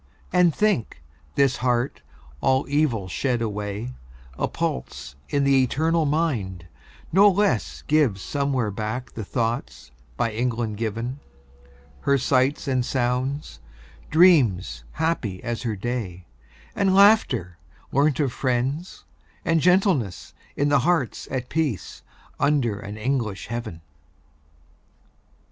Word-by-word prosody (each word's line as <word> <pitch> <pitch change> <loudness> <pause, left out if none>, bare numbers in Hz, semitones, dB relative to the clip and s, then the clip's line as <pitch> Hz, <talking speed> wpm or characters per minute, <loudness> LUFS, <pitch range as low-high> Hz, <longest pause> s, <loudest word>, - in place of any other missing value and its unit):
And 180 -2 +5
think, 155 - 0 0.3
this 135 -2 +3
heart, 125 +1 0 0.4
all 130 0 +2
evil 140 -9 +1
shed 120 +7 -1
away, 105 +2 -4 0.4
A - - -1
pulse 65 +1 -4
in 140 -1 +1
the 135 -1 +4
eternal 160 +5 +1
mind, 120 - -1 0.5
no 200 +4 +7
less 200 +1 0
Gives 145 -10 +2
somewhere 135 -2 -1
back 110 +5 -4
the 110 - -6
thoughts 115 - -3 0.3
by 115 - 0
England 115 -1 -2
given; 115 +4 -3 0.8
Her 140 - +2
sights 130 +2 +1
and 130 -2 +1
sounds; 125 - -2 0.5
dreams 150 - +4
happy 145 - -2
as 120 -1 -3
her 115 -3 -2
day; 100 -5 -4 0.5
And 195 -1 +2
laughter, 140 - +4 0.3
learnt 140 +1 +2
of 135 -5 0
friends; 130 +7 -2 0.4
and 165 -1 +2
gentleness, 180 - +2 0.2
In 145 +1 +1
hearts 145 0 +1
at 130 -2 -3
peace, 150 - -2 0.4
under 140 -8 +1
an 105 +2 -7
English 110 -4 -2
heaven. 115 -8 -5
125 Hz, 115 wpm, -24 LUFS, 110-150 Hz, 0.8 s, no